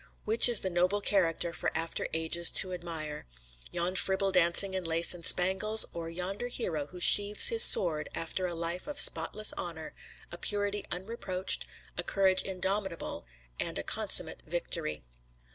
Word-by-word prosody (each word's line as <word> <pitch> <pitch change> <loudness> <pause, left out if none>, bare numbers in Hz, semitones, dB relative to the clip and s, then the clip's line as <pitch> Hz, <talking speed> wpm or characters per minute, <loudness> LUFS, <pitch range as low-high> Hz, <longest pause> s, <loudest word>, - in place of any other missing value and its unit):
Which 225 +3 +4
is 235 -4 +2
the 190 - -4
noble 180 +4 -1
character 175 -4 -2
for - - -4
after 165 +1 -4
ages 160 +1 +2
to 185 -1 +6
admire 160 - -8 0.4
yon 175 +2 -5
fribble 190 +1 -1
dancing 180 +2 +1
in 190 -1 -4
lace 165 +1 +1
and 175 -1 -13
spangles, 190 +6 +5
or 165 -1 -7
yonder 185 +7 -6
hero 165 - -6
who 180 +3 -13
sheathes 205 - +4
his 460 -1 +4
sword 155 -5 +5
after 180 +3 -5
a 175 - -7
life 170 - -5
of 295 - -7
spotless 205 +6 +2
honor, 165 -3 -8 0.4
a 175 - -9
purity 205 0 -2
unreproached, 190 -1 -3 0.3
a - - -2
courage 190 -1 +1
indomitable 190 - -5 0.3
and - - -3
a - - -5
consummate - - +1
victory?" 75 -4 -6
180 Hz, 155 wpm, -28 LUFS, 170-195 Hz, 0.4 s, to